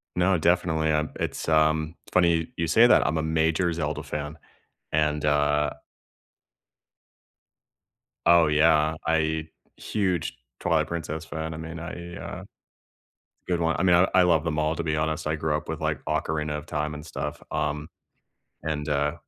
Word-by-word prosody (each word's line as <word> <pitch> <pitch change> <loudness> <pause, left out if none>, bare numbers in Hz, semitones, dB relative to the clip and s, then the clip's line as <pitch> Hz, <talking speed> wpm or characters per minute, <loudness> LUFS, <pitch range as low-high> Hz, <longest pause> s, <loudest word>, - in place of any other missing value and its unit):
No, 90 +1 +3
definitely, 80 -1 +2
um, 75 0 0
it's - - -3
um, 80 0 +2 0.2
funny 85 -2 +3
you 85 - 0
say 115 +9 +6
that, - - +5
I'm 80 +3 0
a 80 - 0
major 80 +2 +1
Zelda 75 -2 -3
fan, 75 +1 -5 0.6
and, 75 -1 +1
uh 75 0 +2 2.6
Oh, 85 -1 +6
yeah, 75 0 +4
I 80 0 +1 0.3
huge 95 -6 -1 0.2
Twilight - - +1
Princess 80 -2 -4
fan, 80 0 -5
I - - -6
mean, 80 +1 -7
I 85 +1 -7
uh, - - -7
a - - -14 1.0
good 90 -2 0
one 80 -1 +1
I - - +1
mean, 90 -2 +5
I 90 +2 +5
I 95 -1 +6
love 85 -4 +3
them 75 -2 -1
all, 75 +1 +1
to 85 - -3
be 80 -1 0
honest, 80 0 -1
I 75 - 0
grew 80 -1 -1
up 75 0 -5
with, - - -3
like, - - -2
Ocarina 75 -1 -1
of 75 - -8
Time 75 -2 -2
and 75 +1 -8
stuff, - - -5
um, 75 0 -2 0.8
and, 75 -1 -2
uh, 75 0 +1
80 Hz, 165 wpm, -26 LUFS, 75-85 Hz, 2.6 s, say